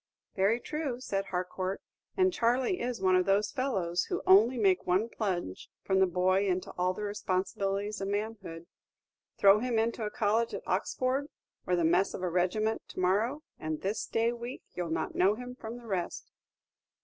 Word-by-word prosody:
"Very 205 +5 +2
true," 295 -3 -3
said 195 -6 -2
Harcourt; 185 +1 -3 0.4
"and 370 -1 +3
Charley 250 +9 +1
is 245 -2 -2
one 185 -1 +4
of 185 +1 +2
those 200 +2 +2
fellows 190 -11 -1
who - - -3
only 220 +7 +6
make 190 -5 +2
one 190 +6 +2
plunge 180 - -3
from 190 -1 +2
the 190 - +5
boy 185 +3 +2
into 185 -1 -1
all 180 +1 0
the 210 - -5
responsibilities 200 +1 -2
of 195 - -2
manhood. 200 -5 -4 0.7
Throw 200 +1 +6
him 240 0 -1
into 225 0 0
a 210 - -1
college 220 +2 0
at - - -6
Oxford, 260 +3 0 0.4
or 180 - +3
the 170 -2 +1
mess 175 +4 +2
of 185 - -6
a 180 - 0
regiment 185 +6 0
to - - -8
morrow, 215 +11 +1 0.2
and 155 -1 -3
this 200 +3 -2
day 230 +1 +1
week 240 +2 -7
you'll 175 -2 -3
not 160 0 -2
know 195 +3 +3
him 250 +2 -7
from 235 -1 -7
the 240 - -13
rest." 190 -5 -4
200 Hz, 180 wpm, -30 LUFS, 185-235 Hz, 0.7 s, only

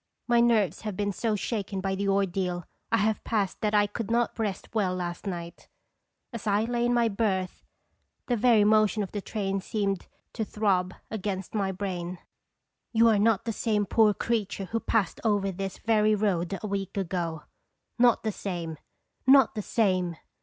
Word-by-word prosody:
My 240 -1 +4
nerves 230 -5 +3
have 210 -4 -5
been 205 -1 0
so 215 +3 -1
shaken 205 -2 -3
by 190 0 -1
the 200 +1 -1
ordeal 185 -3 0 0.3
I 230 - +4
have 215 0 +1
passed 205 -4 -1
that 215 -1 +1
I 205 0 +5
could 205 +1 -5
not 235 0 0
rest 205 -2 -3
well 195 -5 +1
last 175 +2 -4
night. 170 -2 -6 0.6
As 230 -1 -6
I 205 +1 +3
lay 240 +1 0
in 245 - +2
my 235 -1 +3
berth 195 -4 -1 0.6
the 245 - +1
very 230 -2 +5
motion 215 0 +3
of 195 - -7
the 205 - -3
train 195 -2 -2
seemed 195 -1 -2 0.3
to 225 - -2
throb 190 -4 0 0.2
against 195 -3 -4
my 200 -3 0
brain. 180 -2 -4 0.7
"You 230 0 +5
are 215 -2 +3
not 215 -1 +2
the 230 - -1
same 210 -2 0
poor 210 0 +4
creature 205 -4 -1
who 230 +4 -2
passed 215 -6 0
over 205 -3 +1
this 195 +1 -5
very 215 -1 +3
road 195 -3 0
a - - -2
week 195 -1 -3
ago 170 -4 -2 0.6
not 240 -1 +4
the 220 - 0
same 170 -6 -5 0.5
not 270 0 +7
the 215 - -3
same!" 185 -6 +1
205 Hz, 175 wpm, -27 LUFS, 190-220 Hz, 0.7 s, not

